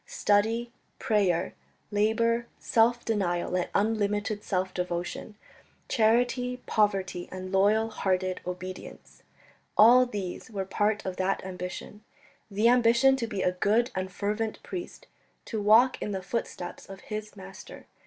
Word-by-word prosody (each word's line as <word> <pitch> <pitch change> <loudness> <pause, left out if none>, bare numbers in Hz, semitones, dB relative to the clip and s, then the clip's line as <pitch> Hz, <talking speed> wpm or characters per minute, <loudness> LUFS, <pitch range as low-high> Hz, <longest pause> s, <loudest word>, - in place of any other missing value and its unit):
Study, 230 - +1 0.3
prayer, 190 -4 +1 0.4
labour, 230 +3 +1
self 235 +1 +2
denial 180 -6 -1
and 180 - -1
unlimited 210 0 0
self 185 0 -1
devotion; 180 +3 -4 0.5
charity, 245 +3 +2
poverty 195 -4 0
and 185 0 -7
loyal 210 +3 +3
hearted 185 -3 -1
obedience 180 +1 -8 0.6
all 250 +3 +7
these 200 -5 -6
were 195 -3 -4
part 205 +2 0
of 185 -1 -4
that 190 0 -1
ambition 185 +3 -7 0.5
the 210 +3 +2
ambition 245 +2 +5
to 235 -3 -2
be 205 -4 -3
a 180 - +2
good 215 +7 +1
and 185 0 -3
fervent 215 +3 -2
priest, 355 -2 -7 0.4
to 220 -3 -3
walk 225 +5 +5
in - - -3
the 190 -1 -4
footsteps 185 -3 -5
of 195 0 -10
his 215 0 -6
Master. 195 0 -11
210 Hz, 130 wpm, -28 LUFS, 185-230 Hz, 0.6 s, all